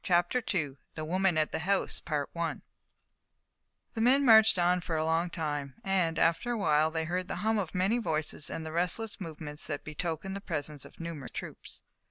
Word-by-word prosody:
CHAPTER 175 +7 +2
II 145 -6 -1 0.2
THE 155 - -4
WOMAN 185 +1 +2
AT 155 -1 +1
THE - - -2
HOUSE 195 +4 0 1.9
The 225 - -2
men 265 +4 +5
marched 220 -3 +8
on 180 +1 +3
for 165 - -3
a 155 - 0
long 165 +2 +1
time, 145 -5 -3
and, 180 -4 +1
after 165 +10 +2
a - - -1
while, 155 -5 +3
they 160 0 -2
heard 180 +2 -2
the - - -3
hum 220 -1 +3
of 185 -4 -4
many 195 +6 +2
voices 155 -6 -2
and 160 - -5
the 160 - -5
restless 180 +6 -1
movements 155 -3 -5
that 145 -2 -4
betokened 170 +5 -4
the 200 - -5
presence 150 -5 -4
of - - -15
numerous 165 -5 -6
troops. - - -9
170 Hz, 185 wpm, -30 LUFS, 155-195 Hz, 1.9 s, marched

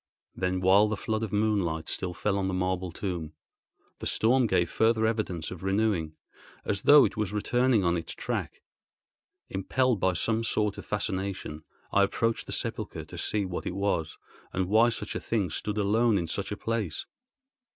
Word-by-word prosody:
Then 90 0 -1
while 95 +3 +6
the 105 -1 -2
flood 110 0 -2
of 110 -3 -3
moonlight 100 -7 0
still 90 -2 -3
fell 105 -1 0
on 95 - 0
the 95 - -1
marble 90 -1 -1
tomb, 85 -3 -4 0.7
the - - -3
storm 125 +2 +3
gave 85 -4 +2
further 110 +2 +2
evidence 105 -8 -1
of 90 -3 -7
renewing, 95 -5 0 0.5
as 100 -1 -1
though 145 +4 +8
it - - -3
was 105 -3 -1
returning 120 +1 +2
on 85 0 +2
its 85 -1 -4
track. - - -4 0.9
Impelled 120 +4 +1
by 95 0 +2
some 110 +6 0
sort 105 -3 0
of - - -10
fascination, 95 -6 -3 0.3
I 100 - +4
approached 115 +3 0
the - - -6
sepulchre - - -3
to - - -10
see 105 -2 0
what 90 -1 -4
it 90 - -3
was, 95 -5 -1 0.3
and 95 -1 -1
why 110 +3 +5
such 110 -2 -4
a - - -2
thing 100 -7 -1
stood 105 +5 -3
alone 110 +2 +3
in 85 -3 -1
such 100 +5 -3
a 105 - -3
place. 110 -8 -2
100 Hz, 180 wpm, -28 LUFS, 90-110 Hz, 0.9 s, though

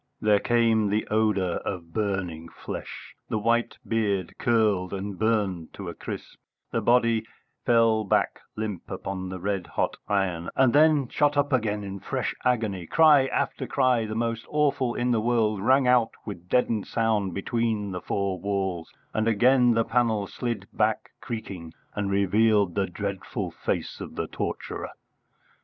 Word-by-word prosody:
There 105 -1 +4
came 115 -3 +2
the 105 +2 0
odour 105 -5 +1
of 85 -4 -6
burning 90 -6 -2
flesh; - - -8 0.2
the - - 0
white 115 +2 +1
beard 100 -5 0
curled 105 -6 +2
and 95 -1 -5
burned 100 -7 0
to 95 -3 -6
a - - -5
crisp; - - -8 0.3
the - - 0
body 115 -2 +3 0.4
fell 115 -2 +4
back 100 - +1 0.2
limp 105 -4 -4
upon 95 -1 -5
the 95 0 -5
red 95 -1 -2
hot - - -1
iron, 90 -4 0
and 130 -3 +4
then 150 -2 +5
shot 145 +2 +1
up 145 0 +2
again 105 -4 0
in 100 0 -6
fresh - - -2
agony; 110 -8 0
cry 150 - +6
after - - -2
cry, 125 -5 +2
the 110 - -4
most 115 0 -2
awful 140 -5 +1
in 125 +1 0
the 115 -2 +2
world, 110 -3 +1
rang 130 +5 +4
out 125 -2 +4
with 90 -4 -8
deadened 115 -4 +1
sound 105 -5 0
between 110 0 -1
the 90 -1 -4
four 100 -2 -2
walls; 95 -3 -2 0.2
and 110 +1 0
again 120 +2 +4
the 115 0 +2
panel 115 -4 +1
slid 115 -1 -4
back 110 0 0
creaking, 95 -8 -6 0.2
and 105 -1 -2
revealed 100 0 +3
the 100 +1 0
dreadful 100 +1 -4
face - - -3
of - - -7
the - - -2
torturer. - - -4
110 Hz, 155 wpm, -26 LUFS, 95-115 Hz, 0.4 s, cry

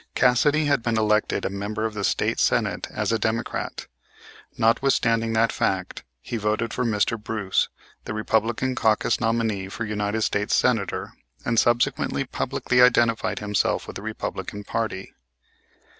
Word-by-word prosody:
Cassidy 145 +5 +3
had 140 -4 +2
been 115 -1 0
elected 105 0 +1
a - - 0
member 105 +2 -3
of 110 - -2
the 100 -1 -4
State - - 0
Senate - - +1
as - - -2
a 115 - +1
Democrat. 110 +2 -2 0.7
Notwithstanding 115 -1 +2
that 115 0 +3
fact 95 -1 -1 0.2
he 120 - -4
voted 110 +2 -1
for 125 - -1
Mr. 110 0 0
Bruce, 105 -4 0 0.4
the - - -4
Republican 110 +4 0
caucus 110 -2 +1
nominee 115 -4 0
for 110 +3 -4
United 105 +1 -1
States 105 0 +1
Senator, 110 -7 0 0.3
and 115 -1 +2
subsequently 120 0 +1
publicly 125 0 0
identified 120 -3 +3
himself 105 -1 0
with - - -9
the - - -6
Republican 105 -1 -5
party. 110 -3 -3
110 Hz, 145 wpm, -24 LUFS, 105-115 Hz, 0.7 s, Cassidy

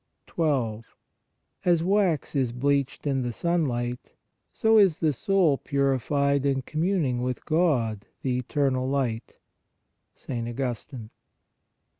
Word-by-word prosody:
12. 125 -9 -2 0.7
As 175 -3 +3
wax 185 -7 +1
is 130 -4 0
bleached 140 +2 0
in 135 -2 0
the 120 -1 -2
sunlight, 125 -6 -2 0.4
so 220 0 +4
is 190 -6 +4
the 155 -3 +1
soul 175 -1 +2
purified 140 0 +1
in 135 -2 0
communing 155 -5 0
with 125 0 -3
God, 125 - +1 0.2
the 130 -2 0
Eternal 130 0 0
Light 125 -5 -2 0.8
(St. 120 -3 -5
Augustine). 120 -1 -5
140 Hz, 110 wpm, -26 LUFS, 125-155 Hz, 0.8 s, so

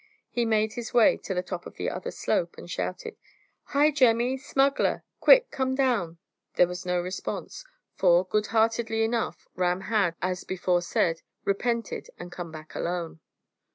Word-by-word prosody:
He 240 -1 0
made 215 -1 +1
his 240 +2 -6
way 235 -3 +6
to 190 - -5
the 180 - 0
top 180 -1 -6
of - - -13
the - - -3
other - - -4
slope - - -1
and - - -10
shouted, 460 -2 -4 0.5
"Hi, 295 +2 +3
Jemmy! 250 -2 +3
smuggler! 270 +1 +1 0.2
Quick! - - +6
Come 260 0 -1
down!" 235 -11 +1 0.4
There 180 - +6
was 180 +1 -7
no 180 0 +1
response, 185 - -5 0.3
for, 175 0 +4
good 210 +3 0
heartedly 225 0 +1
enough, 225 0 -2
Ram 180 0 0
had, 200 -5 +1
as 185 0 -2
before 180 -1 0
said, 170 -1 0 0.2
repented, 230 +3 -1
and 175 0 -9
come 175 -2 -7
back 155 -2 -10
alone. 170 -2 -3
210 Hz, 160 wpm, -27 LUFS, 180-240 Hz, 0.5 s, way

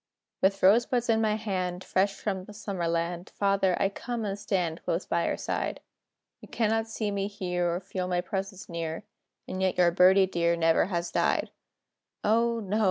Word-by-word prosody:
] - - -62
With 195 +1 +2
rosebuds 235 +4 +4
in 225 -1 +3
my 215 -1 +2
hand, 185 -4 -3
Fresh 195 +2 +1
from 190 -3 -2
the 210 - -12
Summer 195 -5 -3
land, 170 +1 -2
Father, 195 -2 +2
I 195 - +2
come 235 +2 -4
and 200 0 -3
stand 180 -5 -1
Close 170 +3 -1
by 170 0 0
your - - -1
side. - - -2 0.6
You - - -13
cannot 225 0 0
see 220 -2 -3
me 200 0 -1
here, 180 -4 -1
Or - - -2
feel 185 -1 -4
my 180 -1 0
presence 195 0 -5
near, 165 0 -4 0.4
And 185 - -4
yet 190 -1 +1
your 175 -1 +5
"Birdie" 185 +2 +6
dear 170 -2 +1
Never 165 -1 +3
has 175 -2 -2
died. - - +1 0.7
O, 230 +2 +2
no! 210 0 -1
190 Hz, 185 wpm, -28 LUFS, 175-210 Hz, 0.7 s, Birdie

